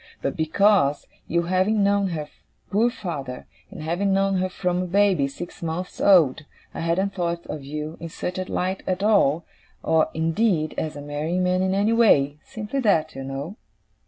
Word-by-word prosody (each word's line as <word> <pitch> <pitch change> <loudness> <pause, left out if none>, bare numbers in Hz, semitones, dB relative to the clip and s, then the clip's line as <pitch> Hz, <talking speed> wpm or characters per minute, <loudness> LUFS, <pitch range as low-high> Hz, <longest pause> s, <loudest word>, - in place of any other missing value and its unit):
but 140 - -2
because, 160 -2 +2 0.2
you 170 +1 +1
having 185 +4 +2
known 200 0 +2
her 155 -4 -4 0.4
poor 225 +4 +3
father, 145 - -6 0.2
and - - -9
having 175 +5 0
known 195 0 +2
her 185 0 0
from 180 -1 -1
a 185 - -3
baby 190 -6 +3
six 175 +6 -9
months 170 +2 -4
old, 160 -7 +5 0.3
I - - -6
hadn't 185 +4 0
thought 170 -2 -2
of 150 -2 -6
you 150 +3 -5
in 165 - -6
such 180 +3 -4
a 185 - -5
light 185 +1 -1
at 185 +1 -1
all, 170 -7 +3 0.4
or 160 -1 +2
indeed 165 0 +1
as 155 -1 -3
a 145 - -7
marrying 155 +5 -2
man 180 0 +1
in 190 0 +1
any 205 +3 +2
way, 150 -11 +4
simply 220 +5 -5
that, 165 -10 +2
you 135 - -6
know. 140 +9 -6
175 Hz, 180 wpm, -24 LUFS, 155-195 Hz, 0.4 s, old